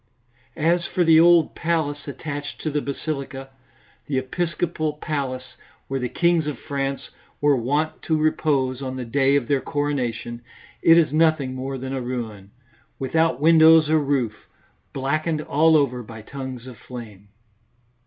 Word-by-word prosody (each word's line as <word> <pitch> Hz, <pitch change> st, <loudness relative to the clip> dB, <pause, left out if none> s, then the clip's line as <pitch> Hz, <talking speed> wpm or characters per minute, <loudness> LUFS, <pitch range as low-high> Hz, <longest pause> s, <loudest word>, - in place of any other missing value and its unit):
As 170 Hz, +2 st, +1 dB
for 180 Hz, -, +1 dB
the 165 Hz, -1 st, +6 dB
old 170 Hz, -1 st, +5 dB
palace 155 Hz, -4 st, -2 dB
attached 145 Hz, +1 st, -6 dB
to 155 Hz, -, -2 dB
the 150 Hz, 0 st, 0 dB
basilica, 140 Hz, -1 st, -5 dB, 0.6 s
the 140 Hz, -, -1 dB
episcopal 155 Hz, +2 st, -2 dB
palace 140 Hz, -4 st, -4 dB, 0.3 s
where 135 Hz, 0 st, -2 dB
the 125 Hz, -1 st, -2 dB
kings 170 Hz, 0 st, +2 dB
of 150 Hz, -, -3 dB
France 140 Hz, -2 st, -4 dB, 0.3 s
were 145 Hz, -1 st, +4 dB
wont 145 Hz, +6 st, -1 dB
to 160 Hz, -, 0 dB
repose 140 Hz, -4 st, 0 dB
on 130 Hz, -1 st, -4 dB
the 130 Hz, -1 st, -5 dB
day 135 Hz, +3 st, +2 dB
of 135 Hz, -4 st, 0 dB
their 140 Hz, -2 st, +1 dB
coronation, 125 Hz, -5 st, -3 dB, 0.4 s
it 165 Hz, 0 st, +6 dB
is 155 Hz, -4 st, +3 dB
nothing 155 Hz, -4 st, +2 dB
more 135 Hz, +1 st, -4 dB
than 130 Hz, +1 st, -5 dB
a 135 Hz, -, -2 dB
ruin, 115 Hz, -6 st, -5 dB, 0.5 s
without 160 Hz, 0 st, +1 dB
windows 160 Hz, 0 st, +6 dB
or 160 Hz, -, +4 dB
roof, 135 Hz, -7 st, -2 dB, 0.4 s
blackened 155 Hz, +4 st, -1 dB
all 155 Hz, +2 st, +4 dB
over 125 Hz, -4 st, 0 dB
by 110 Hz, -1 st, -10 dB
tongues 130 Hz, -1 st, -7 dB
of 125 Hz, -3 st, -10 dB
flame. 110 Hz, -5 st, -10 dB
140 Hz, 150 wpm, -23 LUFS, 130-155 Hz, 0.6 s, the